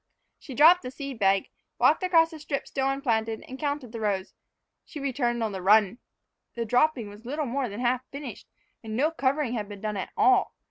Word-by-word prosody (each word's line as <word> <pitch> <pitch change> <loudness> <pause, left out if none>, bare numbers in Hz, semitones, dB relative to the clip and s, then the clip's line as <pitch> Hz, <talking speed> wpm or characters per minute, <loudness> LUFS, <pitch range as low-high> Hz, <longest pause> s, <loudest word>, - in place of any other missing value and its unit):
She 265 - -10
dropped 335 +6 +7
the 250 - -6
seed 270 -2 -7
bag, 195 -1 +2 0.3
walked - - +4
across 335 -3 +4
the 320 - -9
strip 290 -2 -4
still 270 -1 -1
unplanted, 225 -5 -1
and 260 +1 -9
counted 285 -5 -3
the 230 - -6
rows. 200 -3 -2 0.5
She 305 - -9
returned 245 -4 -1
on 220 - -1
the 190 -2 -5
run. 210 +3 +4 0.6
The 235 -1 -2
dropping 250 0 +2
was 205 +2 -12
little 290 +5 -3
more 260 0 -2
than 205 +4 -6
half 250 0 +1
finished, 275 -6 -8 0.4
and 220 -1 -5
no 300 +5 +2
covering 275 -4 0
had 215 -3 -3
been 205 -1 -9
done 215 -1 -3
at 190 - -4
all. 390 -2 +3
250 Hz, 200 wpm, -27 LUFS, 220-285 Hz, 0.6 s, dropped